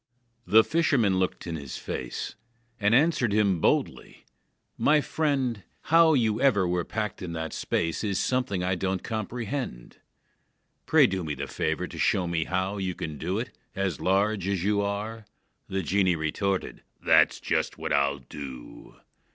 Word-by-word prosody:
The 110 +5 +7
fisherman 130 - +2
looked 95 - -2
in 85 - -4
his 70 -3 -7
face, - - -5 0.5
And 105 +2 +3
answered 140 -5 +3
him 100 -5 +2
boldly: - - -1 0.5
"My 150 +1 +4
friend, 135 -8 -1 0.3
How 165 -2 +7
you 110 -4 +1
ever 105 -10 +3
were 90 0 0
packed 105 0 -4
in 85 -3 -5
that 80 -1 -4
space 85 +2 -1
Is 100 -4 0
something 125 -8 0
I 95 +1 +1
don't 95 +1 -2
comprehend. 115 - -4 0.9
Pray - - +6
do 95 -1 -1
me 75 -2 -3
the - - -4
favor - - -2
to - - -9
show 95 - +2
me 85 -2 -1
how 95 +2 -1
you 95 -2 -2
Can 75 -2 -6
do 90 +4 -2
it, 120 +3 -5 0.2
as 95 -4 -2
large 100 +1 +1
as 95 -3 -1
you 100 +1 +2
are." 105 +2 -3 0.4
The 95 0 -2
genie 95 0 +2
retorted: 90 +5 -2 0.2
"That's - - +5
just - - -1
what - - -3
I'll 70 0 +2
do!" 65 -1 -10
95 Hz, 160 wpm, -27 LUFS, 85-110 Hz, 0.9 s, The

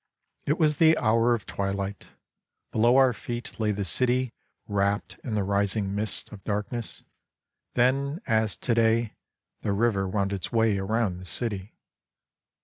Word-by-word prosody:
It 150 +3 +2
was 150 -3 +3
the 160 0 +5
hour 115 +1 +3
of 105 - -7
twilight; 100 0 -3 0.6
below 120 +4 +4
our 130 -2 +5
feet 120 +2 -6
lay 110 -1 +1
the 100 -1 -2
city 125 +5 +1 0.3
wrapt 100 0 -1
in 115 - -3
the 105 - +1
rising 100 0 0
mists 105 +1 -1
of 100 -3 -11
darkness, 105 +3 -3 0.7
then 140 +5 +2
as 110 -3 +1
to 120 - -1
day 115 0 +2 0.5
the 100 - -1
river 100 -2 +1
wound 100 0 0
its 95 - -4
way 110 -4 +2
around 100 -2 -1
the 90 - -10
city. 100 -1 0
110 Hz, 145 wpm, -27 LUFS, 100-120 Hz, 0.7 s, the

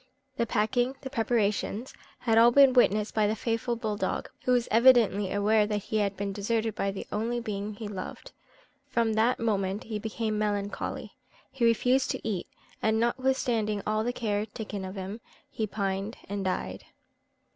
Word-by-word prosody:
The 235 - 0
packing 245 +5 +1
the 265 - -7
preparations 225 -1 0 0.3
had 230 -3 +2
all 230 +1 +8
been 270 +1 +6
witnessed 215 -4 +3
by 215 -1 +3
the 215 - 0
faithful 230 +2 -1
bull 220 -3 -3
dog, - - -2
who 255 - +2
was 245 -1 +3
evidently 225 -5 +5
aware 210 +1 +3
that 210 -1 0
he 220 - -2
had 200 -2 0
been 200 0 -3
deserted 220 +2 -1
by 200 - -1
the 195 - -5
only 230 +3 -1
being 210 -2 -4
he 215 0 -6
loved. 195 -3 -7 0.6
From 230 -2 +1
that 225 +4 +2
moment 200 -3 0
he 215 -2 -4
became 220 0 -2
melancholy. 205 -1 -2 0.4
He 260 -3 0
refused 250 +3 +3
to - - -3
eat, 195 -5 -2 0.3
and 220 0 +2
notwithstanding 235 -4 0
all 215 +1 +1
the 240 - 0
care 215 -3 -1
taken 205 -2 -6
of 185 +1 -7
him, 195 +4 -6 0.3
he 220 - -2
pined 195 +1 -3
and 200 0 -3
died. 185 -1 -3
220 Hz, 170 wpm, -28 LUFS, 205-235 Hz, 0.6 s, all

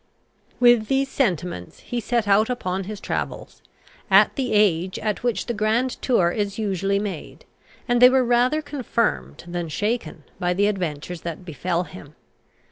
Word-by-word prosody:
With 240 -3 +5
these 270 +2 +1
sentiments 180 - -2
he 245 - -4
set 235 -1 -1
out 205 +3 +4
upon 190 -6 -2
his 210 +1 -6
travels, - - -5 0.5
at - - +6
the 265 -3 -2
age 190 -4 +2
at 210 -1 -2
which 240 -2 -1
the 240 - -2
grand 225 +4 +1
tour 185 -10 +2
is 205 0 -2
usually 200 -2 0
made; 200 -6 -6 0.4
and 240 -1 +2
they 250 - +10
were 260 -1 +3
rather 245 +6 +2
confirmed 255 -6 -2
than 175 -1 -4
shaken 205 -4 -2 0.2
by 180 0 0
the 200 +2 +2
adventures 175 -4 -3
that 170 +2 -6
befel 170 +2 -2
him. 155 -5 -12
205 Hz, 155 wpm, -23 LUFS, 180-240 Hz, 0.5 s, they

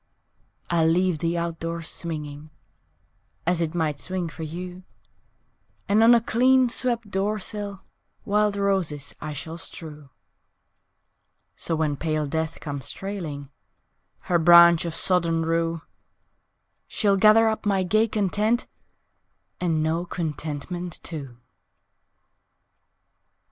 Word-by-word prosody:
I'll 165 -2 +3
leave 175 0 +2
the 170 +2 -1
out 170 -1 -3
door 165 0 -4
swinging, 155 -3 -6 1.0
(As 175 0 +1
it 165 0 -2
might 155 -4 -1
swing 185 -2 -3
for 165 - -10
you) 180 +3 -6 1.1
And 205 +2 +3
on 225 - +6
the 240 -1 +7
clean 255 +2 +3
swept 235 -3 -1
door 200 +3 0
sill 205 -1 -6 0.4
Wild 210 0 +2
roses 185 -8 0
I 155 0 -5
shall 160 +4 -6
strew 150 -4 -8 1.5
So 165 - -2
when 155 -2 0
pale 155 -1 -1
Death 160 +2 -3
comes 140 -3 -5
trailing 160 -8 -6 0.7
Her 175 -1 +1
branch 170 0 +7
of 165 -1 -4
sodden 170 -3 +2
rue 165 0 -1 1.0
She'll 200 -3 +2
gather 215 +3 +6
up 220 -1 -1
my 195 -2 +2
gay 215 +5 +2
content 215 +3 0 0.9
And 165 -3 0
know 165 +2 0
contentment 165 +1 -4
too! 140 -7 -6
170 Hz, 115 wpm, -24 LUFS, 160-200 Hz, 1.5 s, the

